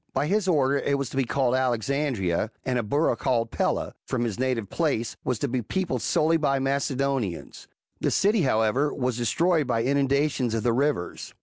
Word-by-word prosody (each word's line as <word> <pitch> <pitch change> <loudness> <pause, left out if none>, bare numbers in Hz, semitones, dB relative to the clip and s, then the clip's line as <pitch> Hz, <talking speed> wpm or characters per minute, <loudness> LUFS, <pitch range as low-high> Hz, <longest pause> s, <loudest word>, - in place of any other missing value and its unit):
By 135 +2 +1
his 200 +4 +1
order 140 -5 +2
it 140 0 0
was 140 -3 -4
to - - -8
be 135 -1 +1
called 125 0 +1
Alexandria, 125 - 0 0.2
and 125 -1 0
a - - +1
borough 145 +9 +1
called 115 -3 0
Pella, - - -1
from 120 -2 -2
his 115 -3 -3
native 125 -5 -1
place, 135 -9 -1
was 125 - -1
to 140 - -1
be 125 0 -1
peopled 185 - -2
solely 160 +2 +2
by 140 -3 +1
Macedonians; 135 -6 -2 0.3
the - - +1
city, 205 +1 +2
however, 130 +2 +2
was 125 -2 -2
de 120 - -1
stroyed 165 +4 +2
by 115 -2 +1
inundations 140 -2 +1
of 115 - -2
the 120 -1 +2
rivers. 140 -7 -2
135 Hz, 190 wpm, -25 LUFS, 120-145 Hz, 0.3 s, order